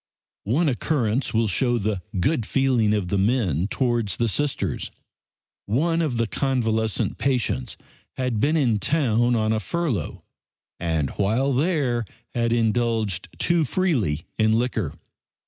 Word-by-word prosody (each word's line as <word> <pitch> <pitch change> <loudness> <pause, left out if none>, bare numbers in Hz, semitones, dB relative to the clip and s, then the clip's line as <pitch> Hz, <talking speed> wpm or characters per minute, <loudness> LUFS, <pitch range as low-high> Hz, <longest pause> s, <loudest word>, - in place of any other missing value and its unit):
One 155 +8 +2
occurrence 125 -2 0
will 115 0 +2
show 120 +4 +1
the 105 -3 -1 0.2
good 130 - +1
feeling 125 -3 +2
of 105 -4 0
the 100 - +1
men 95 - +1
towards 120 -5 0
the 120 - +1
Sisters. 145 +6 -1 0.8
One 165 +10 +1
of 145 -7 -1
the 115 - +2
convalescent 110 -4 0
patients 120 - -1 0.4
had 125 -4 -1
been 150 +7 +2
in 120 -8 +2
town 120 -4 +2
on 110 -1 +1
a 110 - 0
furlough, 140 - -2 0.6
and 80 -5 -1
while 115 +8 +1
there 135 -5 +1 0.3
had 115 -1 0
indulged 115 -4 0
too 170 -2 +2
freely 125 - 0
in 110 0 +4
liquor. 110 - -1
115 Hz, 130 wpm, -24 LUFS, 105-135 Hz, 0.8 s, in